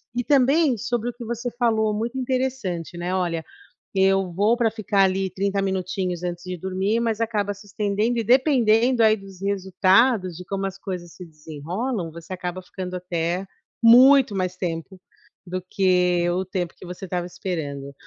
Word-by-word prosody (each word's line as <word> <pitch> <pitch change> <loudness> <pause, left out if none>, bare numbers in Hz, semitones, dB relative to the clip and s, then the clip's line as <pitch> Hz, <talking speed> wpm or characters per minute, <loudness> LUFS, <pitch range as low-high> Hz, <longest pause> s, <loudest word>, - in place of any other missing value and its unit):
E 245 - 0
também 280 +1 +3
sobre 240 +1 -2
o - - -6
que 240 -1 -9
você 235 +1 -4
falou, 220 -3 +2
muito 235 +5 -3
interessante, 250 -10 -2
né, 175 +2 -3
olha, 170 -3 -1 0.5
eu 195 -1 +3
vou 210 +7 +2
para 230 -2 +2
ficar 205 -3 +1
ali 190 0 +1
30 195 +2 -1
minutinhos 185 -2 -2
antes 175 0 -4
de 180 -1 -5
dormir, 190 +5 -1
mas 230 -1 -1
acaba 205 -3 -1
se 200 +1 -15
estendendo 210 +3 0
e - - 0
dependendo 245 -2 +4
aí 215 0 +5
dos 195 -2 -13
resultados, 195 +1 +2
de 180 - -8
como 195 +1 -3
as 195 0 -4
coisas 180 -4 -6
se 180 - -10
desenrolam, 165 - -5
você 170 +3 -9
acaba 180 0 -5
ficando 185 0 -7
até 175 +1 -2 0.4
muito 255 0 +7
mais 185 -1 -2
tempo 175 +1 -4 0.5
do 185 +1 -3
que 180 -2 +2
o 185 +2 0
tempo 180 -2 -3
que - - -11
você 180 +2 -7
estava 180 -1 -3
esperando. 145 -7 -5
195 Hz, 170 wpm, -23 LUFS, 180-230 Hz, 0.5 s, muito